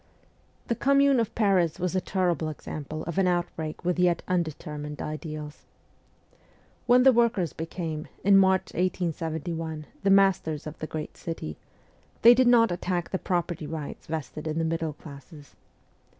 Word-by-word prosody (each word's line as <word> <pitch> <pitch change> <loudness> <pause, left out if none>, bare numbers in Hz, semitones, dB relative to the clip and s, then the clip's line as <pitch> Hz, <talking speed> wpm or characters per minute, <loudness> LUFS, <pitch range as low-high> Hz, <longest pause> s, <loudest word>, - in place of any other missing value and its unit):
The - - 0
Commune 275 +2 +3
of 230 - -2
Paris 190 -7 +2
was 180 +1 -1
a 185 - +2
terrible 175 -4 0
example 155 0 -6
of 170 +3 -3
an 190 - +3
outbreak 175 -2 -2
with 180 0 0
yet 175 -2 +2
undetermined 150 -4 -3
ideals. 155 -1 -6 1.2
When 250 +1 +6
the 265 0 +7
workers 225 -8 +2
became, 160 -1 -5 0.2
in 200 0 +6
March 190 -1 +3
1871, 165 -3 -2 0.2
the 195 - +1
masters 195 -6 +3
of 155 0 -8
the 155 - -4
great 155 -1 -6
city, 120 - -5 0.7
they 235 +1 +10
did 255 0 +3
not 230 -4 +5
attack 175 0 -2
the 190 - -1
property 175 -3 -2
rights 155 -3 -6
vested 155 0 -5
in 155 0 -2
the 165 - +1
middle 160 -1 -2
classes. 145 0 -13
170 Hz, 150 wpm, -27 LUFS, 155-190 Hz, 1.2 s, they